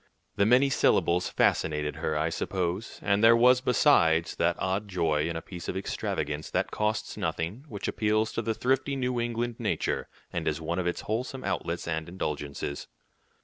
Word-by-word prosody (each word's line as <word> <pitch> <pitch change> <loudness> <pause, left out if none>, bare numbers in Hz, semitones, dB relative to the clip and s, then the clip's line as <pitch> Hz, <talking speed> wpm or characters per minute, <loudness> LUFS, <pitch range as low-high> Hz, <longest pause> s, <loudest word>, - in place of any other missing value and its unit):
The 100 - +3
many 130 +4 +5
syllables 90 -8 +2
fascinated 75 -1 +1
her, 80 -1 -1
I 80 +2 +1
suppose, 90 +4 -3
and 100 +1 +2
there 115 +1 +8
was, 125 +2 +5
besides, 95 - +3
that 85 0 +2
odd 95 +3 -1
joy 80 -4 0
in 85 - -3
a 80 - -4
piece 90 -3 -7
of 95 - -2
extravagance 75 -5 -3
that - - -1
costs 105 0 -1
nothing, 100 - -3
which 105 -8 -5
appeals 110 0 +1
to - - -2
the 115 0 -1
thrifty 135 +3 0
New 125 -2 -1
England 120 0 -2
nature, - - -1 0.2
and - - -2
is - - 0
one 85 +2 -2
of 90 - -1
its 90 - -2
wholesome 125 +4 -3
outlets 85 0 -2
and 80 0 -2
indulgences. 75 -5 -4
95 Hz, 175 wpm, -28 LUFS, 80-115 Hz, 0.2 s, there